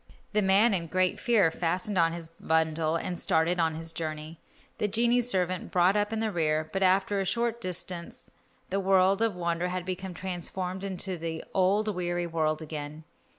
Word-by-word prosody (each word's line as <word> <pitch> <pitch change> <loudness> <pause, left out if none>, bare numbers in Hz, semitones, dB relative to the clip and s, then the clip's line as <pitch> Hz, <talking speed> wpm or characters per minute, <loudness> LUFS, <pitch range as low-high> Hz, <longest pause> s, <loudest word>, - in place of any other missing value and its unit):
The 210 - +3
man, 200 +4 +4
in 170 -3 -1
great 185 +2 +1
fear, 210 -9 +3
fastened 180 +6 -1
on 165 -2 +4
his 165 -1 -7
bundle 160 0 +1
and 175 +1 -2
started 165 +2 +1
on 160 -1 +1
his 165 0 -5
journey. 155 0 -5 0.4
The 210 - +1
genie 235 +4 +3
servant 185 -6 -1
brought 180 +2 +3
up 205 0 +1
the 220 0 -1
rear, 155 -3 +1
but 195 - -1
after 190 +2 +3
a - - +1
short 235 +4 0
distance 180 -2 -3 0.4
the 195 - +1
world 190 +1 +3
of 225 -4 +2
wonder 170 0 -1
had 180 0 -3
become 185 0 -5
transformed 185 +1 -4
into 190 -2 -2
the 160 0 -4
old 205 +3 +2
weary 175 -1 -1
world 160 -2 -1
again. 150 0 -6
180 Hz, 175 wpm, -28 LUFS, 165-195 Hz, 0.4 s, man